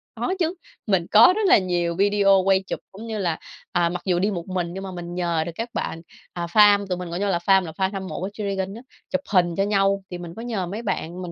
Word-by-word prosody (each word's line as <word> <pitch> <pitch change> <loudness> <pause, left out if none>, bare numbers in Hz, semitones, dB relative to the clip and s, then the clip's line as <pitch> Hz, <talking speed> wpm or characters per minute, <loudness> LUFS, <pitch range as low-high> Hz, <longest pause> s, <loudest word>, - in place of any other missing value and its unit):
Có 370 - -1
chứ, 335 -1 +1 0.3
mình 190 -4 +2
có 225 +11 +8
rất 435 - 0
là 375 - +7
nhiều 175 -3 -1
video 200 0 +4
quay 195 0 +3
chụp, - - -3
cũng 215 +4 -9
như 220 -1 -3
là, 175 -5 -1 0.3
à, 175 -1 +2
mặc 175 +1 -4
dù 180 -2 +1
đi 200 +3 +1
một 175 -3 -5
mình 180 -2 -3
nhưng 195 - -6
mà 190 - -6
mình 175 -1 -7
nhờ 170 -3 0
được 170 - -4
các 230 +5 -4
bạn, 165 - -3 0.3
à, 175 -1 -3
FAM, 205 +1 +5
tụi 180 -1 -2
mình 180 -1 -6
gọi 175 - -4
nhau 205 0 0
là 175 - +2
FAM, 190 +2 +4
là 160 - -6
fan 190 +3 -1
hâm 190 -1 -4
mộ - - -5
của 185 - -3
G-Dragon 195 -2 -3
á, 230 - -9 0.3
chụp 275 0 -1
hình 175 -3 +3
cho 195 - +1
nhau, 195 -1 +1
thì 180 - -5
mình 175 -1 -8
có 225 - -7
nhờ 225 -6 -2
mấy 205 +6 -5
bạn 185 -5 -3
mình 175 - -6
190 Hz, 275 wpm, -23 LUFS, 175-205 Hz, 0.3 s, có